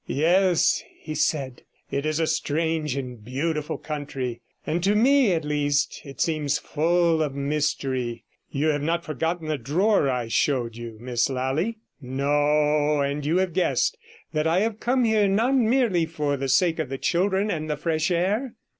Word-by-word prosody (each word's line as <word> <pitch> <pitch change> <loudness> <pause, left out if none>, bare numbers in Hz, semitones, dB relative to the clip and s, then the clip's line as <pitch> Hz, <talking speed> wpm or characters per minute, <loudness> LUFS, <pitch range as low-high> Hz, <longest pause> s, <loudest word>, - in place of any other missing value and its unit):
'Yes,' 175 +4 +3 0.2
he 155 - -6
said, 140 -4 -1 0.3
'it 140 +2 -1
is 155 +1 0
a 165 - +2
strangely 155 -3 -1
beautiful 130 +6 -3
country; 135 -5 -5 0.2
and 170 +2 -1
to 200 +2 +3
me, 255 0 +4
at 165 -3 0
least, 145 -1 0
it 135 -2 -11
seems 155 -3 +1
full 165 +1 +1
of 145 -3 -1
mystery. 140 -4 -1 0.3
You 145 +3 0
have 145 -1 0
not 170 +3 -1
forgotten 165 +1 -2
the 155 -2 -1
drawer 160 - +2
I 125 -3 -1
showed 120 -1 0
you, 115 -1 -8
Miss 120 +1 0
Lally? 135 - -1 0.2
No; 145 +3 +1
and 140 +1 -1
you 155 +5 +1
have 185 -2 0
guessed 190 - +1 0.4
that 155 +1 +1
I 170 +4 +2
have 220 0 -1
come 250 +1 +1
here 220 -3 +3
not 225 +7 +2
merely 230 -9 +2
for 150 -3 -1
the 135 0 -3
sake 165 +4 +3
of 155 -5 -2
the 135 - -3
children 190 +6 +1
and 155 -1 -3
the 150 - -1
fresh 160 +1 0
air?' 200 +9 0
155 Hz, 165 wpm, -25 LUFS, 140-175 Hz, 0.4 s, me